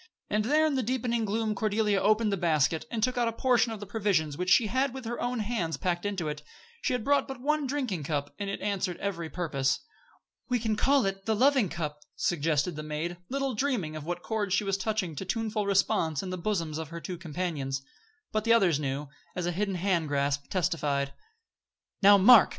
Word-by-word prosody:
And 210 0 +1
there 305 +5 +4
in 310 - +1
the 265 - +1
deepening 235 -1 0
gloom 215 +1 0
Cordelia 210 -1 +1
opened 215 +1 +3
the - - +2
basket, 160 - +1
and 225 -3 -2
took 250 0 +1
out 240 - +2
a - - +1
portion 240 -1 +2
of 220 - -5
the 205 - -6
provisions 195 -8 0
she 225 +5 +5
had 260 +4 0
with 260 -2 -7
her 240 +1 -4
own 245 -1 -1
hands 200 -7 -2
packed 175 +1 -1
into 190 -6 -2
it. 150 0 -4 0.4
She - - 0
had 250 -3 -1
brought 285 +3 +2
but 265 -2 -6
one 295 +2 0
drinking 250 - -2
cup, 145 -1 -2
but 200 - -3
it 195 - -3
answered 190 -3 -1
every 170 -5 -3
purpose. 140 -5 0 0.7
"We 250 - +3
can 220 -2 0
call 270 +4 +3
it 195 +1 -3
'the 220 - +2
Loving 260 -3 +4
Cup,'" 150 -3 -4 0.2
suggested 160 0 0
the 155 - -4
maid, 155 +3 -4
little 275 0 -1
dreaming 220 - -1
what 170 +3 -5
chords 205 -4 0
she 210 - +1
was 195 -1 0
touching 195 -4 -2
to - - -3
tuneful 215 +1 -1
response 170 -5 +2
in 185 - -5
the - - -2
bosoms 170 -5 -1
of 160 -2 -5
her 170 0 -6
two 180 0 -6
companions. 150 -5 -3 0.5
But 215 -1 0
the 230 +1 +4
others 185 -10 +4
knew, 140 0 -3 0.3
as 180 - -2
a 175 - 0
hidden 195 +2 -1
hand 175 -3 +1
grasp 140 0 0
testified. 150 -7 0 0.9
"Now, 200 0 +8
mark!" 215 +3 +8
195 Hz, 205 wpm, -29 LUFS, 165-225 Hz, 0.9 s, Now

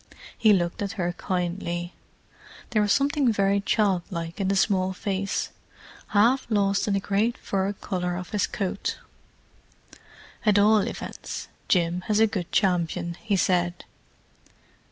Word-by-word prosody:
He 220 -2 +4
looked 175 -2 +1
at 200 0 -2
her 175 -4 -2
kindly; 175 -1 -3 0.8
there 215 -3 +3
was 205 -1 +2
something 280 -1 +3
very 200 -1 +2
child 200 -3 +2
like 170 +2 -5
in 190 - 0
the 195 - +1
small 190 -1 +2
face, 195 0 -2 0.6
half 235 +6 +3
lost 200 -2 +1
in 200 - +1
the - - +2
great 205 +4 0
fur 195 0 -1
collar 180 -3 -3
of 180 0 -7
his 205 -2 +1
coat. 195 -1 -3 1.5
"At 210 -2 +4
all 210 +1 +6
events, - - -5 0.2
Jim 175 -1 +2
has 210 0 +2
a 225 - +7
good 190 -5 -3
champion," 170 -3 +1
he 210 -2 0
said. 175 0 +1
195 Hz, 140 wpm, -26 LUFS, 180-210 Hz, 1.5 s, a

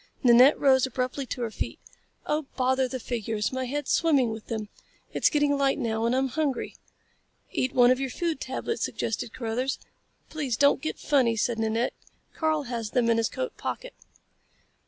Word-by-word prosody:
Nanette 250 +3 +7
rose 265 -2 +4
abruptly 255 +1 -3
to 245 - -4
her 225 - -3
feet. - - -4 0.5
"Oh 300 -1 -1
bother 260 0 +2
the 260 0 -5
figures. 225 -2 -2
My 260 0 -2
head's 290 +4 -3
swimming 280 -8 +3
with 220 -1 -8
them. 220 -2 -3 0.5
It's - - +3
getting 290 -1 +2
light 275 -1 +2
now, 225 0 -1
and 240 - +1
I'm 265 0 +1
hungry." 295 -1 -2 0.8
"Eat 255 - -1
one 245 0 +6
of 255 - +2
your 270 -1 -2
food 330 +3 -2
tablets," 260 - -3
suggested 225 0 -3
Carruthers. 245 +3 -2 0.5
"Please 280 -7 -2
don't 285 -1 +4
get 310 - -3
funny," 255 -6 +2
said 225 +1 0
Nanette. 225 +2 0 0.4
"Karl 315 -2 0
has 235 -4 -4
them 235 0 +2
in 230 - +3
his 225 - +1
coat - - -4
pocket." - - -5
255 Hz, 175 wpm, -27 LUFS, 230-285 Hz, 0.8 s, Nanette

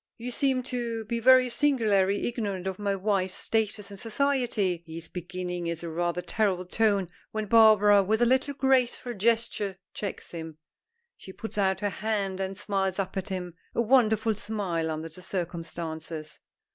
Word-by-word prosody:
"You 245 +2 -5
seem 260 0 +1
to, 235 -3 -3
be 235 +2 -2
very 255 +1 +6
singularly 220 -7 +2
ignorant 205 -6 -3
of 190 0 -3
my 200 -1 0
wife's 190 -1 0
status 215 -2 -1
in 200 - -8
society 225 -6 0
" - - -45
he 160 0 -7
is 165 0 -6
beginning 180 0 -5
is 170 0 -3
a 170 - -4
rather 175 +2 -1
terrible 195 -4 0
tone, 200 -1 +2 0.2
when 215 0 -3
Barbara, 210 -2 +6
with 215 +3 +1
a 240 - +4
little 260 +3 +2
graceful 255 -2 +2
gesture, 220 -2 0 0.2
checks 200 - -5
him. 160 -2 -7 0.6
She 190 - -11
puts 220 +1 -6
out 190 -1 +1
her 205 - +1
hand 200 -2 -2
and 190 0 -3
smiles 195 -2 -1
up 190 -2 -2
at 190 +1 -3
him, 180 -2 -4 0.2
a - - +3
wonderful 225 -2 +3
smile 200 -6 -2
under 160 +1 -3
the 165 +3 -13
circumstances. 165 -3 -5
200 Hz, 170 wpm, -28 LUFS, 180-225 Hz, 0.6 s, very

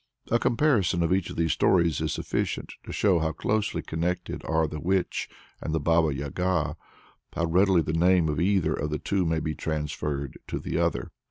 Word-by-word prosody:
A 115 - +4
comparison 120 - +2
of 85 - 0
these 95 -1 +2
three 85 0 -1
stories 85 -1 +2
is - - -1
sufficient - - -2
to - - -7
show 95 -5 +3
how 80 0 -1
closely 105 +7 -1
connected 90 +2 -2
are 80 0 +2
the 75 0 -6
Witch 95 +3 -1 0.3
and 80 - -2
the - - +1
Baba 80 +1 +3
Yaga, 75 +3 -1 0.6
how 85 - 0
readily 90 +1 +4
the 80 - -2
name 90 0 +4
of 75 0 -1
either 95 -1 +2
of 75 - -2
the 75 - -1
two 95 +3 0
may 80 0 +1
be 80 -1 -2
transferred 75 -3 -3
to - - -3
the - - -4
other. - - 0
85 Hz, 185 wpm, -27 LUFS, 75-95 Hz, 0.6 s, A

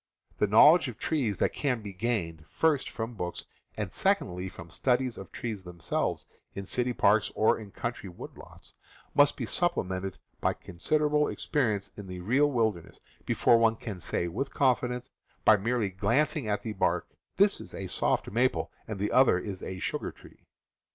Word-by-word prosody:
The 105 - +3
knowledge 145 - +7
of 120 -4 -7
trees 125 - -1
that - - +1
can 125 -6 -1
be 100 -2 -7
gained, 90 -7 -2
first 155 - +1
from 115 +1 -5
books 90 -5 -5 0.3
and - - -3
secondly 90 +1 0
from 85 -2 -11
studies 125 +5 +1
of 95 - -10
trees 110 -5 -5
them 90 -1 -11
selves 80 - -1 0.3
in 100 - -5
city 125 +5 0
parks 105 -2 +3
or 110 - +3
in 105 -2 -9
country 115 -1 -5
wood 85 - -10
lots, - - -15 0.4
must 145 0 +4
be 125 - -2
supplemented 95 - -1 0.2
by - - +1
considerable 150 - 0
experience 110 -9 -1
in 100 -2 -9
the 90 -1 -6
real 130 +11 +3
wilderness 110 - -1 0.3
before 115 - +4
one 115 -1 +4
can 105 -5 -7
say 85 - -1
with 120 +11 -3
confidence, 125 -1 +1 0.3
by 110 - +8
merely 110 +1 0
glancing 130 +8 +1
at 105 -1 -1
the 110 - -3
bark, - - 0 0.3
"that - - +4
is - - -10
a - - -5
soft - - 0
maple, 125 +4 +1 0.2
and 110 -2 -4
the 100 +2 -1
other 130 -8 +5
is 95 0 -5
a 95 - -5
sugar - - -3
tree." - - -18
110 Hz, 175 wpm, -29 LUFS, 95-125 Hz, 0.4 s, by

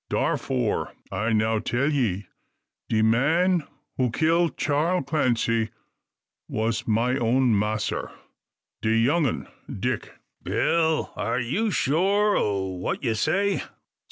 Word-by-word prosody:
Darfore, 125 -5 -1 0.2
I 105 +4 -1
now 110 0 +2
tell 120 +5 0
ye, 105 -9 0 0.6
de 110 -1 +2
man 160 +9 +2 0.3
who 130 -1 +2
kill 165 +6 +2
Charl 160 +5 0
Clancy 120 -6 +1 0.8
was 110 +1 -2
my 115 +4 +2
own 125 0 +2
massr 105 +1 -1 0.7
de 110 - 0
young 145 +7 +3
un - - -3 0.2
Dick." - - -3 0.3
"Bill! 160 -2 +1
are 115 +2 -1
you 165 - 0
sure 200 +6 +2
o' 100 -2 0
what 95 +6 -4
ye 120 -3 +1
say?" 195 - +1
125 Hz, 115 wpm, -25 LUFS, 110-160 Hz, 0.8 s, young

